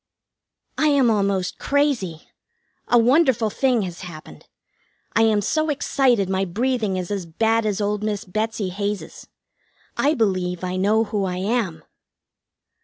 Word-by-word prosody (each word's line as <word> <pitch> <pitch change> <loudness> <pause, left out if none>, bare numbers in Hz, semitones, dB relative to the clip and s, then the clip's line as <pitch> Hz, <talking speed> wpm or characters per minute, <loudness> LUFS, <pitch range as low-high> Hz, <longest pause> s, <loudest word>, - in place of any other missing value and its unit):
I 310 - +3
am 275 -5 +4
almost 200 -3 0
crazy! 265 - 0 0.6
A 240 - +4
wonderful 245 -2 +3
thing 250 -2 +1
has 175 -2 -6
happened. 170 -4 -11 0.7
I 225 - +4
am 220 -2 +3
so 310 +9 0
excited 260 -7 +1
my 190 0 0
breathing 215 +1 -1
is 180 +1 -4
as 195 -4 -3
bad 225 +6 +1
as 205 -1 -1
old 210 0 -1
Miss 210 0 -2
Betsy 215 +1 -2
Hays's. 200 +2 -5 0.7
I 295 +3 +2
believe 185 -5 -1
I 185 0 -2
know 210 +4 +2
who 205 -2 -2
I 180 -1 -3
am. 195 -3 -1
210 Hz, 140 wpm, -22 LUFS, 190-240 Hz, 0.7 s, am